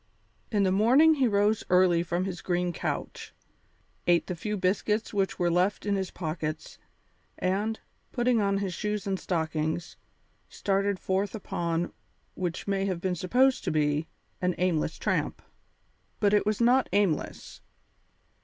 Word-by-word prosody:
In 205 -2 +2
the 190 - +2
morning 255 +11 +5
he 270 -4 +2
rose 205 0 +2
early 180 -2 +4
from 175 +1 -1
his 185 -3 -5
green 175 -1 -1
couch, - - -4 0.7
ate 175 -1 +4
the 180 - -4
few 210 +5 -3
biscuits 210 +4 0
which 195 -2 0
were 175 -2 +1
left 180 +5 +1
in 205 -1 +1
his 190 -2 -2
pockets, 155 -2 -5 0.6
and, 205 +4 -1 0.3
putting 240 -2 +2
on 200 -1 +1
his 195 -2 -2
shoes 210 +1 -3
and 195 -2 -1
stockings, 160 -1 -2 0.5
started 200 0 0
forth 190 +3 -1
upon, 170 -4 -2 0.4
what 175 0 -4
might 195 0 0
have 185 -3 -2
been 185 +1 -1
supposed 250 +10 +2
to - - -1
be, 150 0 +1 0.3
an 180 -1 +1
aimless 165 -3 0
tramp. - - -1 0.8
But 205 -1 +3
it 210 0 +3
was 215 -1 +1
not 250 +2 +4
aimless. 200 -7 -1
190 Hz, 145 wpm, -28 LUFS, 175-210 Hz, 0.8 s, morning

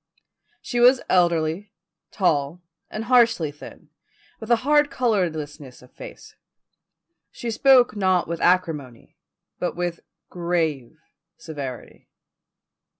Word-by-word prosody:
She 240 - -3
was 250 +1 +5
elderly, 175 +2 +1 0.4
tall, 155 -4 0 0.3
and 215 - -5
harshly 230 - +3
thin, 150 - -14 0.5
with 220 - -9
a 240 - +6
hard 295 0 +4
colourlessness 155 - -3
of 125 - -19
face. - - -12 0.9
She 235 - -6
spoke 250 -1 +4
not 185 -3 +1
with 170 0 -5
acrimony, 160 -9 -1 0.4
but 180 - -3
with 175 -1 -3 0.3
grave 160 -6 -2 0.4
severity. 140 -6 -9
175 Hz, 100 wpm, -23 LUFS, 155-225 Hz, 0.9 s, a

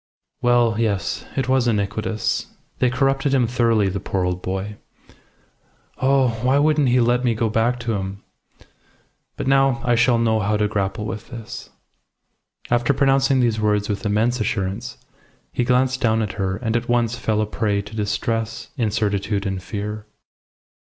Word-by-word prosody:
"Well, 120 -3 +3
yes. 105 -4 -1
It 135 -2 0
was 130 -2 +2
iniquitous. 105 0 -1 0.3
They 125 - +3
corrupted 135 +2 +1
him 125 -3 +3
thoroughly, 115 -3 +2
the 95 +1 -2
poor 95 0 -2
old 90 0 -2
boy. 95 +3 -4 1.2
Oh! 135 -1 +3
why 130 +3 +3
wouldn't 150 -2 +3
he 125 +1 +4
let 120 +1 +2
me 120 -3 +2
go 110 0 0
back 120 +3 +1
to 115 -1 -2
him? 100 0 -4 1.1
But - - -3
now 135 -2 +3
I 120 - +3
shall 120 +1 +4
know 110 -1 +2
how 105 +1 +1
to 105 0 +1
grapple 100 0 -2
with 110 +1 -6
this." 115 -3 -8 1.0
After 120 +3 +2
pronouncing 135 -1 +3
these 115 -3 +1
words 105 -1 +1
with 105 -1 -2
immense 110 +3 +1
assurance, 105 +3 -2 0.6
he 125 - 0
glanced 130 +1 +1
down 110 -1 +2
at 105 - -3
her, 95 -2 -2
and 110 +3 -2
at 120 - -1
once 120 -1 +1
fell 110 -3 -1
a 110 - +2
prey 105 -1 -1
to 105 +2 -11
distress, 110 +1 -2
incertitude, 105 -3 0
and 95 -1 -2
fear. 105 +1 -5
115 Hz, 160 wpm, -22 LUFS, 105-125 Hz, 1.2 s, he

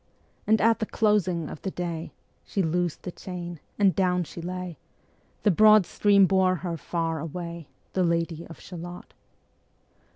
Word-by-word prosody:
And 220 +1 +4
at 225 +1 +4
the 220 - -2
closing 185 -7 +1
of 150 - -8
the 190 - -2
day 170 -3 -4 0.3
She 195 - -1
loosed 175 0 -1
the 180 - -5
chain, 175 -2 -7 0.2
and 195 -5 +4
down 180 -1 +2
she 170 +1 -9
lay; 180 -1 -5 0.6
The 210 - +5
broad 215 +1 +7
stream 200 +1 +4
bore 185 -1 +3
her 170 0 -4
far 165 0 -2
away, 170 0 -6
Ā - - -39
Ā - - -42
The 185 - +2
Lady 170 -1 -1
of 165 - -11
Shalott. 175 0 -9
180 Hz, 165 wpm, -26 LUFS, 170-190 Hz, 0.6 s, broad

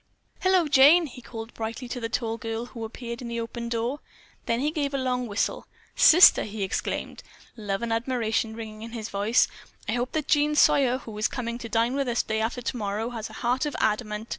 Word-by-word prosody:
"Hello, 370 -3 +3
Jane," 295 +5 +6
he 250 -3 -10
called 225 -1 -8
brightly 225 +3 -5
to 250 - -4
the 230 -1 -3
tall 230 -1 -1
girl, 225 +1 -4
who 235 -2 -8
appeared 235 +1 -6
in 245 - -6
the 235 0 -3
open 235 +1 -5
door. 235 +4 -2 0.5
Then 230 0 +1
he 295 +3 0
gave 285 -3 -2
a - - +1
long 250 -2 -1
whistle. 205 -1 -2 0.3
"Sister," 350 +3 +8
he 210 -1 -5
exclaimed, 190 - -3 0.3
love 205 -2 -3
and 230 -1 -1
admiration 225 -2 -1
ringing 215 -1 -8
in 230 +1 -8
his 225 -2 -5
voice, 205 +4 +2 0.4
"I - - 0
hope 245 +2 -2
that 310 -2 -2
Jean 300 0 +3
Sawyer, 260 -3 +4
who 225 -4 -10
is 215 - +2
coming 235 -1 -4
to 230 - -7
dine 230 +3 +1
with 275 -1 -1
us 240 -1 +1
day 220 0 -2
after 240 +2 -2
tomorrow, 220 -1 -3
has 225 -2 -5
a - - -13
heart 255 +5 +1
of 295 - -5
adamant. 215 0 -1
235 Hz, 215 wpm, -26 LUFS, 225-255 Hz, 0.5 s, Sister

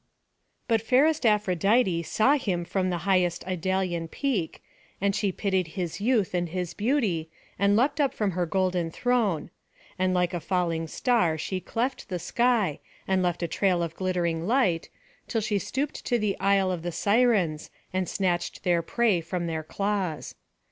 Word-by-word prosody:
But 225 -3 +2
fairest 270 +4 +3
Aphrodite 200 -1 +2
saw 220 - +2
him 190 -11 -1
from 185 +1 -1
the 175 -1 -3
highest 180 -3 +1
Idalian 185 -1 -1
peak, 210 - -2 0.4
and 200 0 +1
she 200 -2 0
pitied 190 -2 0
his 180 +1 -3
youth 220 -5 +1
and 175 -1 0
his 180 0 -3
beauty, 210 - 0 0.3
and 200 +1 +4
leapt 280 +6 +2
up 275 -2 +2
from 210 -6 -1
her 175 -1 -1
golden 185 -2 0
throne; 215 -5 0 0.5
and 185 0 +2
like 180 0 +1
a 175 - -1
falling 170 -2 -1
star 180 -5 +1
she 185 +4 -3
cleft 240 +6 -3
the 180 - -2
sky, 215 - +1 0.3
and 190 -1 +2
left 175 -1 -1
a - - 0
trail 180 0 +1
of 165 -1 -4
glittering 175 -3 -1
light, 225 -9 +1 0.4
till 225 - 0
she 210 -1 0
stooped 275 +9 -3
to 240 - +2
the 210 -3 0
Isle 195 -1 +3
of 175 -2 -3
the 175 +1 -3
Sirens, 200 -7 +2 0.2
and 185 -1 -1
snatched 175 -3 -1
their 175 -2 +2
prey 210 0 +1
from 170 +1 -3
their 160 -1 -2
claws. 190 -1 -2
185 Hz, 165 wpm, -27 LUFS, 175-220 Hz, 0.5 s, and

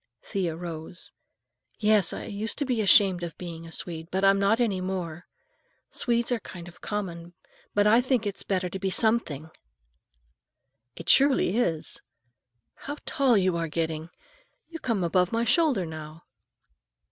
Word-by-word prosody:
Thea 180 -5 -2
rose. 170 0 -6 0.7
"Yes, 210 -4 +3
I - - -5
used 215 +2 -1
to 285 - -1
be 250 -4 0
ashamed 195 -3 +5
of 170 -3 -6
being 165 -2 -7
a - - -11
Swede, 165 -1 -4
but 190 +1 0
I'm 195 0 +5
not 200 +4 +3
any 205 -6 +1
more. 180 -3 -4 0.6
Swedes 235 0 0
are 245 - +1
kind 175 -4 -10
of 175 - -14
common, 175 -5 -5 0.4
but 205 0 +4
I 225 +3 +6
think 250 -3 0
it's 200 -1 -3
better 185 -2 -1
to 190 +2 -6
be 190 0 -1
something." 185 - 0 1.4
"It 165 - -10
surely 270 -7 +5
is! 170 -10 0 0.7
How 290 +1 -7
tall 270 -6 +3
you 185 -2 +2
are 165 0 -1
getting. 160 0 -3 0.6
You 330 -1 -7
come 225 - -1
above 180 +2 +2
my 230 +1 +1
shoulder 245 - +3
now." 155 0 -9
190 Hz, 155 wpm, -27 LUFS, 170-225 Hz, 1.4 s, I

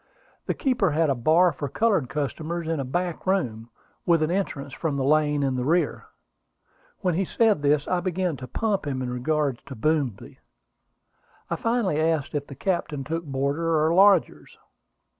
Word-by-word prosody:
The - - 0
keeper 250 -8 +1
had 155 0 +2
a - - +3
bar 160 +8 +4
for 145 -1 -5
colored 195 - +1
customers 155 +5 -3
in 165 -2 -1
a - - -1
back 175 +7 -3
room, 120 - -1 0.3
with 165 -2 +3
an 155 - 0
entrance 145 -8 -3
from 145 0 -2
the 135 - 0
lane 150 0 +2
in 135 -1 +1
the 125 -1 -2
rear. 165 +6 0 0.9
When 180 -3 +1
he 185 +4 +1
said 215 -2 +2
this, 145 0 +2
I 180 - +1
began 180 -2 -1
to 130 - -8
pump 200 - -1
him 130 -2 -2
in 125 - -3
regard 140 0 -1
to 135 - -7
Boomsby. 140 -2 -1 1.1
I - - +1
finally 230 -10 0
asked 160 -3 0
if 145 -1 -3
the 140 - -9
captain 155 -4 -2
took 165 +4 -4
boarders 140 +2 -1
or 160 -1 +2
lodgers. 195 -1 +3
155 Hz, 175 wpm, -25 LUFS, 140-175 Hz, 1.1 s, bar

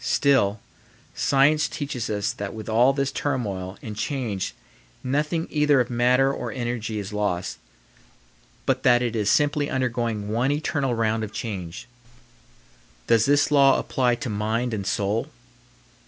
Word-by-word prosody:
Still, 125 -8 +2 0.5
science 145 +3 +3
teaches 140 -6 -4
us 105 0 -1
that 105 -3 -6
with 110 -1 -8
all 120 +4 +4
this 140 0 -1
turmoil 100 -11 -3
and 110 -2 -6
change 110 -5 -3 0.5
nothing 150 +5 0
either 150 -2 +3
of 125 0 0
matter 125 +3 +3
or - - -4
energy 120 -3 -3
is 100 0 -5
lost, 100 -4 -2 1.1
but - - +1
that 120 0 +4
it 120 -1 -2
is 105 -2 +1
simply 145 +2 +2
undergoing 120 -5 -1
one 120 +5 +1
eternal 145 -3 0
round 110 -1 0
of 105 - -5
change. 95 -7 -6 1.2
Does 115 -1 +4
this 145 +1 +3
law 140 -2 +6
apply 125 -2 +1
to 125 0 -5
mind 110 +3 -1
and 100 -3 -3
soul? 105 +9 -1
120 Hz, 140 wpm, -24 LUFS, 105-135 Hz, 1.2 s, law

